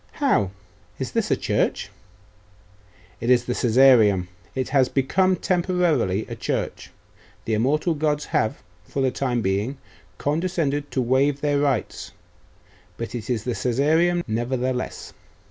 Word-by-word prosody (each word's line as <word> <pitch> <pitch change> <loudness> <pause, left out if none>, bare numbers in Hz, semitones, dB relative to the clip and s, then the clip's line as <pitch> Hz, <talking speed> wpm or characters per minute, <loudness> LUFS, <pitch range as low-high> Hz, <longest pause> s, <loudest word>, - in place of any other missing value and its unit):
'How? 270 - +1 0.5
Is - - -4
this - - -1
a - - +3
church?' - - -1 1.3
'It 115 - -2
is 120 -1 +4
the 125 - -1
Caesareum. 115 -7 +4 0.3
It 130 -1 -2
has 130 -2 +3
become 185 +8 +2
temporarily 175 - +1
a - - -6
church. - - -3 0.6
The 110 - -1
immortal 145 +10 +1
gods 150 -1 -1
have, 110 - -1 0.2
for 135 - -3
the 130 - +2
time 125 -4 -1
being, 100 +8 -1 0.4
condescended 150 - -1
to 130 - -1
waive 135 +3 +2
their 145 -1 +1
rights; 130 -10 -1 0.8
but 115 -1 -5
it 115 -2 -6
is 115 -4 -1
the 125 - -2
Caesareum, 155 +10 +2
nevertheless. 125 +3 -3
130 Hz, 130 wpm, -23 LUFS, 115-150 Hz, 1.3 s, is